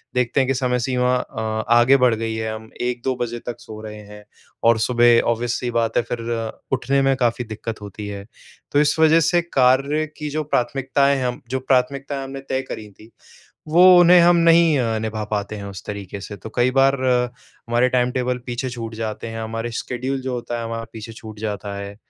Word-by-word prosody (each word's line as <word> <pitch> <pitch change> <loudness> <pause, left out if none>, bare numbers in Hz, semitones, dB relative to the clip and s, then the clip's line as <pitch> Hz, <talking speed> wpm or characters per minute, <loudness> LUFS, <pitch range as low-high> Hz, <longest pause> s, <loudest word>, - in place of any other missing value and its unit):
देखते 125 +1 +1
हैं 130 - +2
कि 135 - +2
समय 125 -1 0
सीमा 125 0 +1
अ, 110 -2 -4
आगे 120 +3 +6
बढ़ 125 -3 +3
गई 110 0 -3
है 110 0 -3
हम 110 0 -11
1-2 125 +1 -1
बजे 120 -1 -4
तक 120 -1 -5
सो 110 -2 -10
रहे 105 -1 -8
हैं 105 0 -12 0.4
और 115 -1 +4
सुबह 120 0 +4
ऑब्वियस 120 +1 -1
सी 125 - -3
बात 115 -1 0
है - - +3
फ़िर 115 -1 -3 0.2
उठने 135 +2 0
में 135 0 +3
काफ़ी 120 -1 0
दिक्कत 110 0 -6
होती 105 +1 -8
है। 100 -1 -7 0.5
तो 145 - +3
इस 150 +1 +2
वजह 160 +1 +6
से 175 +2 +3
कार्य 140 0 +2
की 150 -1 -4
जो 155 +1 -2
प्राथमिकताएँ 140 +1 +1
हैं, 130 - -2
हम 125 - -4
जो 130 +1 -1
प्राथमिकताएँ 135 +2 0
हमने 135 0 -7
तय 130 0 0
करी 105 -1 -7
थी 110 +2 -16 0.6
वो 170 +4 +5 0.2
उन्हें 175 +1 +7
हम 175 +1 +5
नहीं 165 -2 +5 0.2
निभा 110 -1 -3
पाते 105 0 -2
हैं 100 - -7
उस 100 -2 -8
तरीके 100 -1 -6
से। 105 +1 -8
तो 110 - -10
कई 120 +1 +3
बार 135 0 +5
हमारे 125 -1 0
टाइम 125 -1 +1
टेबल 125 0 -1
पीछे 125 +1 -3
छूट 115 -2 -6
जाते 110 0 -5
हैं 115 0 -6
हमारे 115 +1 -4
स्केड्यूल 130 +2 -3
जो 130 0 -3
होता 120 -1 -4
है 115 - -4
हमारा 115 0 -4
पीछे 115 0 -8
छूट 110 -1 -11
जाता 105 -2 -4
है। 100 0 -7
120 Hz, 205 wpm, -21 LUFS, 110-135 Hz, 0.6 s, उन्हें